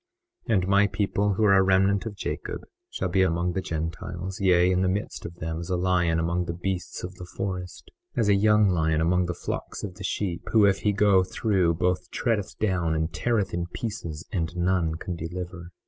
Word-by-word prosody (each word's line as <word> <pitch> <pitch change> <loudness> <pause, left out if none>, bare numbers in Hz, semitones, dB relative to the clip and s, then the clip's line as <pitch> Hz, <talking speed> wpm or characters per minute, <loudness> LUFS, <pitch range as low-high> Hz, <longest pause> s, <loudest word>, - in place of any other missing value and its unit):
21:12 115 - +1
And 95 -2 +1
my 100 +1 +4
people 100 0 0
who 110 - +1
are 100 -2 +6
a 95 - +6
remnant 95 +3 +3
of 105 - -6
Jacob - - -4 0.3
shall - - -2
be 95 - +2
among 85 -1 +1
the 95 - -1
Gentiles, 85 +3 -4
yea, 90 -1 +4
in 90 0 +2
the 95 - +2
midst 100 +3 -3
of 85 - -11
them 80 -1 -4
as 85 - -6
a 90 - +1
lion 90 -2 +2
among 85 +2 0
the 85 - -4
beasts 90 +1 -4
of 90 +1 -5
the 90 -1 -9
forest, 90 -2 -5 0.2
as 115 - +2
a 100 - +5
young 105 +1 +4
lion 80 -4 +2
among 90 +2 +2
the 90 - -3
flocks - - -5
of 95 -4 -5
sheep, 95 -2 -2
who, 110 -2 +6
if 100 -1 +3
he 105 - +2
go 100 -2 +4
through 95 -3 +1
both 90 +2 0
treadeth 110 -6 -1
down 90 -6 0
and 80 +1 -1
teareth 110 -5 0
in 85 0 -2
pieces, 85 -7 -5
and 85 -2 -2
none 90 -2 +1
can 90 +2 -5
deliver. 85 +1 -6
90 Hz, 210 wpm, -26 LUFS, 85-100 Hz, 0.3 s, are